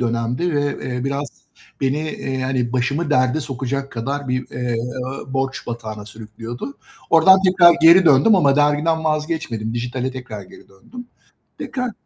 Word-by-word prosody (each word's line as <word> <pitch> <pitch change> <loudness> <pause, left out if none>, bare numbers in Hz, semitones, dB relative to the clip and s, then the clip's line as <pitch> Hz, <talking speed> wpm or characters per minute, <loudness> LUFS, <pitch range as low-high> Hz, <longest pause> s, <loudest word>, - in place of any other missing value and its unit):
dönemdi 120 +8 -1
ve, 145 0 0 0.2
eee, 125 0 -3
biraz 140 +1 -2 0.5
beni, 135 +1 0
eee, 155 -3 -5
yani, 130 -2 -1
başımı 140 +5 -1
derde 130 +1 +2
sokacak 135 0 -4
kadar 135 +4 -4
bir, 130 0 -2
eee, 125 -1 -3 0.6
borç 135 0 -2
batağına 110 -3 -6
sürüklüyordu. 115 - -9 0.3
Oradan 190 +4 +6
tekrar 180 -2 +6
geri 170 +3 +8
döndüm 155 +7 +5
ama 140 -7 +3
dergiden 150 +2 +2
vazgeçmedim, 155 -8 -2
dijitale 125 +2 -3
tekrar 120 -5 -8
geri 95 - -16
döndüm. 230 - -12 0.5
Tekrar 250 -2 -4
135 Hz, 140 wpm, -20 LUFS, 120-155 Hz, 0.6 s, geri